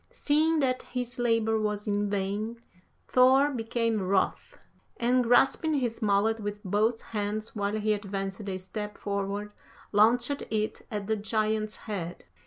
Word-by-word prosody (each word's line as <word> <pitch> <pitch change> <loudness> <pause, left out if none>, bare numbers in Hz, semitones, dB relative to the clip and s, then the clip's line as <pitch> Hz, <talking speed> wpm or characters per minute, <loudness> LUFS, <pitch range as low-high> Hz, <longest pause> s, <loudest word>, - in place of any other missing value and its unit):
Seeing 310 +2 +2
that 255 -2 +1
his 245 -1 -5
labour 225 -2 +2
was 210 0 -2
in 205 0 0
vain, 205 +3 -2 0.5
Thor 265 +3 +5
became 230 -3 -1
wroth, 190 +1 0 0.4
and 245 +1 +3
grasping 270 +6 +3
his 245 -4 -1
mallet 215 +2 +2
with 205 -1 -4
both 215 +4 +1
hands 215 +1 -2
while 205 0 -1
he 215 0 +2
advanced 195 0 -4
a 190 - -2
step 210 +3 -6
forward, 200 +1 -3 0.4
launched 235 +6 +3
it 215 0 -1
at 210 -3 -4
the 220 +2 +1
giant's 215 0 -1
head. 180 -5 -5
215 Hz, 140 wpm, -28 LUFS, 205-235 Hz, 0.5 s, Thor